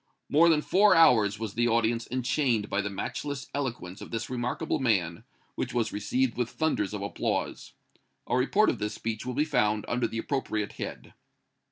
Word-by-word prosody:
More 165 +3 +5
than 155 -2 +3
four 205 +2 +5
hours 110 -11 +5
was 110 -2 -5
the 120 +1 +1
audience 115 0 +1
enchained 125 -3 0
by 100 - +1
the 100 - -3
matchless 130 +7 -4
eloquence 120 -9 -4
of - - -8
this 115 +2 -4
remarkable 125 +6 -2
man, 95 -10 0 0.3
which - - -4
was 115 -2 0
received 115 +5 0
with 120 -1 0
thunders 140 -11 -1
of 100 - -4
applause. 100 - -3 0.5
A - - 0
report 170 +12 +3
of - - -6
this 105 0 -3
speech 115 +1 -4
will 125 - -3
be 150 +2 +2
found 105 -8 +1
under 125 +1 0
the 115 - -6
appropriate 110 -5 -2
head." - - -7
120 Hz, 180 wpm, -28 LUFS, 105-135 Hz, 0.5 s, More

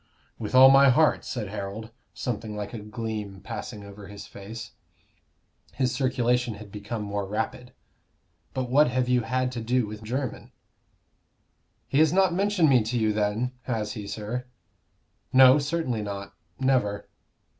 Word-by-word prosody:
"With 110 +3 -3
all 130 +1 +10
my 135 0 +7
heart," 155 +4 +3
said 115 -6 -4
Harold, 105 +2 -6 0.2
something 110 -3 -4
like 105 +1 -5
a 115 - -5
gleam 105 -2 -5
passing 105 +2 -7
over 100 0 -11
his 100 0 -9
face. 110 +3 -9 1.0
His 130 -1 0
circulation 125 -2 +1
had 105 -1 -11
become 105 +2 -5
more 100 -1 -3
rapid. 110 +4 -3 0.8
"But 130 -1 -1
what 145 +5 +5
have 125 0 0
you 125 -1 +3
had 125 +2 -1
to 120 -2 -5
do 125 +1 +1
with 105 +1 -8
Jermyn?" 125 +3 -4 1.4
"He 140 - +1
has 155 -1 +5
not 190 -1 +3
mentioned 195 -2 +2
me 130 -3 +5
to 115 +3 -2
you 110 -2 +2
then 105 +4 0
has 110 -4 -2
he, 105 -1 -6
sir?" 110 +5 -4 0.8
"No; 130 +2 +8
certainly 140 -6 -1
not 100 -1 -6 0.3
never." 125 -7 +1
115 Hz, 150 wpm, -26 LUFS, 105-130 Hz, 1.4 s, all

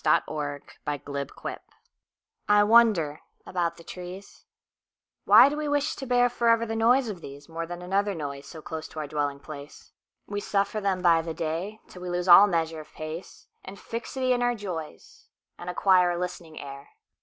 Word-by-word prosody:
The - - +4
Sound 145 -2 -4 0.3
of 145 -2 -3
the 140 -1 -3
Trees - - -7 0.9
I 205 0 +6
WONDER 205 -9 +4 0.2
about 170 -2 -1
the 170 - -13
trees. 180 +3 -10 0.8
Why - - +9
do 290 - -1
we 300 0 -3
wish 290 +1 0
to 270 - -7
bearForever 240 -2 +3
the 225 - -3
noise 240 +3 +4
of 205 -5 -5
theseMore 160 +4 -7
than 175 +1 -7
another 200 +2 0
noiseSo 145 0 -7
close 160 -1 -6
to 160 - -9
our 155 - -3
dwelling 145 -1 -2
place? 145 0 -11 0.3
We 205 0 -4
suffer 205 +1 -1
them 190 -2 0
by 165 -2 +5
the 165 -1 -5
dayTill 180 +4 -5
we 180 - -5
lose 175 +1 -2
all 190 +3 +10
measure 165 -3 -1
of 155 - -12
pace, 155 +3 -8 0.2
And 195 +1 -10
fixity 255 +3 -2
in 245 - 0
our 245 0 +2
joys, 205 - -8 0.3
And 175 - -6
acquire 180 -1 +4
a 175 - -1
listening 175 -3 -5
air. 140 0 -9
180 Hz, 175 wpm, -27 LUFS, 155-215 Hz, 0.9 s, all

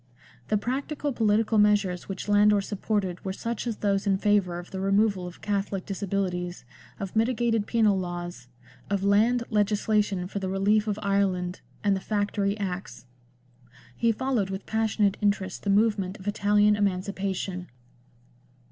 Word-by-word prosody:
The 210 - +2
practical 275 +5 -2
political 220 -1 +2
measures 205 -4 +2
which 195 +1 -5
Landor 205 0 +5
supported 195 -2 -2
were 190 - -3
such 230 +4 -4
as 225 -3 -2
those 200 0 0
in 195 -1 +3
favour 195 -4 +2
of 175 0 -9
the 190 - -4
removal 195 -1 +2
of 175 - -12
Catholic 200 -2 -2
disabilities, 180 -6 -3 0.3
of 195 0 -5
mitigated 225 -1 +1
penal 215 -4 +3
laws, 175 -6 -5 0.4
of 200 -1 0
land 220 +5 +3
legisla 210 0 +2
tion 190 -3 -4
for 200 - -4
the 190 -1 -3
relief 205 +3 +2
of 210 -1 -1
Ireland, 190 -2 0 0.2
and 200 -1 +3
the - - -2
Factory 205 0 -1
Acts. 190 -7 -5 0.9
He 230 - +2
followed 240 -4 -1
with 195 +1 -5
passionate 220 -2 +1
interest 200 -3 0
the 200 - -3
movement 205 -2 +2
of 190 - -11
Italian 205 0 +3
emancipation. 190 -2 -2
200 Hz, 145 wpm, -27 LUFS, 190-210 Hz, 0.9 s, Landor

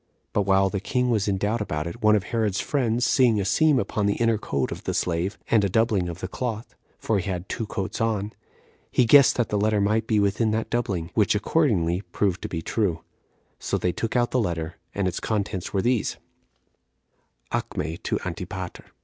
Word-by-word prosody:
But 100 -2 +1
while 95 0 +3
the 100 - -1
king 125 +5 0
was 105 -3 +1
in 100 -1 +1
doubt 105 +3 -1
about 75 -7 -2
it, 85 - -7
one 110 0 +5
of 105 - +1
Herod's 105 -3 -1
friends 120 -4 0
seeing 120 -5 +4
a 100 - -1
seam 150 +9 +3
upon 105 -4 0
the 100 - +1
inner 115 -2 +1
coat 70 -9 -2
of - - -7
the - - -1
slave, 90 +4 -1
and 110 -3 +5
a 100 - +1
doubling 105 -3 +1
of 85 +1 -7
the 90 - -3
cloth, 115 +1 -4 0.2
[for 110 -3 0
he 95 +2 -4
had 90 0 -4
two 115 -3 -3
coats 95 0 -4
on,] 110 -2 -1 0.6
he 125 - +3
guessed 140 +3 +7
that 120 - 0
the 105 - 0
letter 105 0 +2
might 110 +2 +1
be 110 -2 +2
within 100 +3 +2
that 110 +1 -2
doubling; 95 -8 -1
which 105 -2 +3
accordingly 100 - +1
proved 100 -3 -1
to - - -5
be 80 -1 -4
true. 90 -7 -1 0.6
So - - -1
they 90 - 0
took 115 +6 -3
out 120 -1 +2
the 130 - +2
letter, 85 -4 -3 0.2
and 100 -2 0
its 90 - -2
contents 100 -4 -2
were 95 -2 0
these: 125 -3 0 1.3
"Acme 80 +2 -3
to - - -1
Antipater. - - -6
105 Hz, 205 wpm, -25 LUFS, 95-115 Hz, 1.3 s, guessed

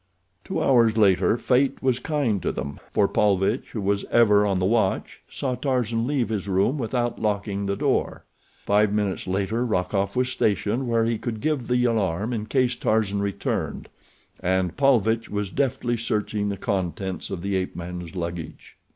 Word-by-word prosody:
Two - - -3
hours 115 -4 +4
later 105 +1 +4
fate 130 +3 +1
was 130 -2 +2
kind 125 - 0
to - - -1
them, 70 0 -5
for 100 - +3
Paulvitch, 100 +4 +1
who 110 - -3
was 100 0 0
ever 105 -3 +4
on 100 -2 +1
the 90 - 0
watch, 100 -2 0
saw 130 -2 -2
Tarzan 120 -3 -1
leave 135 -5 0
his 105 -3 -3
room 100 +9 +1
without 120 0 -2
locking 100 -2 -1
the 100 - 0
door. - - -1 0.4
Five 105 0 +3
minutes 105 -3 -1
later 100 +5 0
Rokoff 100 -2 -1
was 125 0 +1
stationed 110 +2 0
where 115 -1 +2
he 115 -1 -1
could 115 -3 -4
give 150 -2 -1
the 125 0 +2
alarm 105 -1 0
in 110 -2 -3
case 130 -1 +2
Tarzan 110 -4 0
returned, 100 -1 -3 0.5
and 90 -1 0
Paulvitch 115 -5 +2
was 105 -2 -3
deftly 125 -2 0
searching 105 -2 -1
the 100 - -3
contents 95 -4 -3
of 85 - -5
the 100 0 -1
ape 95 -1 -2
man's 90 0 -7
luggage. 85 -2 -6
105 Hz, 170 wpm, -24 LUFS, 100-120 Hz, 0.5 s, hours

